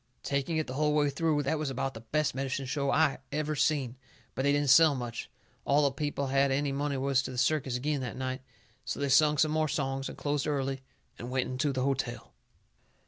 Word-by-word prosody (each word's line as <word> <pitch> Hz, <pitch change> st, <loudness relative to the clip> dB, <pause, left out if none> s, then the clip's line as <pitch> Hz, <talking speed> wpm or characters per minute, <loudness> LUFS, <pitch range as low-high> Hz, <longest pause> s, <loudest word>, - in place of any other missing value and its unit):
Taking 140 Hz, +3 st, -1 dB
it 155 Hz, -, 0 dB
the 130 Hz, -, -6 dB
hull 150 Hz, +2 st, +1 dB
way 145 Hz, -1 st, +2 dB
through, 150 Hz, 0 st, +1 dB
that 150 Hz, +3 st, 0 dB
was 155 Hz, -2 st, -2 dB
about 135 Hz, +1 st, -2 dB
the 110 Hz, -, -9 dB
best 150 Hz, +7 st, 0 dB
medicine 135 Hz, +1 st, -3 dB
show 140 Hz, +1 st, -1 dB
I 150 Hz, -3 st, +2 dB
ever 155 Hz, +1 st, -1 dB
seen. 135 Hz, -5 st, 0 dB, 0.4 s
But -, -, -2 dB
they 140 Hz, +1 st, +3 dB
didn't 145 Hz, -2 st, +2 dB
sell 155 Hz, +1 st, +7 dB
much. 120 Hz, -2 st, -5 dB, 0.3 s
All 145 Hz, +1 st, +3 dB
the 140 Hz, -, +3 dB
people 145 Hz, 0 st, -3 dB
what 135 Hz, -, -3 dB
had 135 Hz, 0 st, +3 dB
any 140 Hz, +1 st, 0 dB
money 140 Hz, 0 st, -1 dB
was 135 Hz, 0 st, +2 dB
to -, -, -6 dB
the 130 Hz, -, -7 dB
circus 130 Hz, -1 st, +1 dB
agin 145 Hz, +2 st, -1 dB
that 125 Hz, -2 st, -5 dB
night. 130 Hz, 0 st, -3 dB, 0.4 s
So 130 Hz, -, -4 dB
they 140 Hz, 0 st, 0 dB
sung 150 Hz, +2 st, +5 dB
some 155 Hz, +1 st, +3 dB
more 155 Hz, 0 st, +1 dB
songs 135 Hz, -3 st, -2 dB
and -, -, -9 dB
closed 145 Hz, 0 st, -1 dB
early 135 Hz, -2 st, -1 dB, 0.4 s
and 120 Hz, -, -6 dB
went 130 Hz, 0 st, -1 dB
into 140 Hz, +3 st, 0 dB
the 130 Hz, -1 st, -1 dB
hotel. 125 Hz, -4 st, -2 dB
140 Hz, 225 wpm, -30 LUFS, 130-150 Hz, 0.4 s, sell